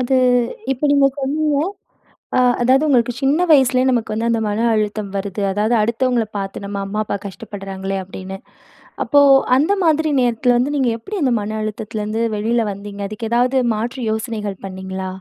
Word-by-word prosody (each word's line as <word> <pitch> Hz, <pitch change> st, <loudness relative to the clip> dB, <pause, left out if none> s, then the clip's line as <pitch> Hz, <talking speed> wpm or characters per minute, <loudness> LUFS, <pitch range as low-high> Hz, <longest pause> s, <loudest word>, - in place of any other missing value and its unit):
அது 255 Hz, +1 st, +1 dB, 0.6 s
இப்ப 270 Hz, +3 st, -4 dB
நீங்க 280 Hz, -1 st, +5 dB
சொன்னீங்க, 290 Hz, +2 st, 0 dB, 0.8 s
அ -, -, +5 dB, 0.2 s
அதாவது 260 Hz, +5 st, +4 dB
உங்களுக்கு 245 Hz, -3 st, +2 dB
சின்ன 290 Hz, +6 st, +2 dB
வயசுலே 260 Hz, -3 st, +5 dB
நமக்கு 235 Hz, -4 st, 0 dB, 0.2 s
அந்த 230 Hz, -1 st, +1 dB
மன 210 Hz, +3 st, 0 dB
அழுத்தம் 210 Hz, -1 st, -2 dB
வருது, 195 Hz, +1 st, -3 dB
அதாவது 210 Hz, +4 st, +1 dB
அடுத்தவுங்கள 235 Hz, +1 st, +1 dB
பாத்து, 195 Hz, 0 st, -5 dB
"நம்ம 200 Hz, 0 st, -4 dB
அம்மா 205 Hz, +2 st, -4 dB
அப்பா 200 Hz, -, -3 dB
கஷ்டப்படுறாங்களே!" 195 Hz, -2 st, -6 dB
அப்பிடின்னு. 190 Hz, +1 st, -8 dB, 0.7 s
அப்போ 285 Hz, -, +4 dB, 0.4 s
அந்தமாதிரி 320 Hz, -1 st, +2 dB
நேரத்துல 245 Hz, 0 st, +2 dB
வந்து 265 Hz, +4 st, 0 dB
நீங்க 260 Hz, -3 st, +2 dB
எப்பிடி 395 Hz, -, -6 dB
அந்த 260 Hz, -, +2 dB
மன 215 Hz, +1 st, -4 dB
அழுத்தத்துலருந்து 215 Hz, 0 st, -3 dB, 0.2 s
வெளில 230 Hz, +3 st, +1 dB
வந்தீங்க? 200 Hz, +1 st, -9 dB
அதுக்கு 220 Hz, +1 st, -5 dB
ஏதாவது 250 Hz, +2 st, +2 dB, 0.2 s
மாற்று 235 Hz, +5 st, -4 dB
யோசனைகள் 220 Hz, -3 st, -4 dB
பண்ணீங்களா? 190 Hz, 0 st, -6 dB
225 Hz, 150 wpm, -19 LUFS, 205-260 Hz, 0.8 s, நீங்க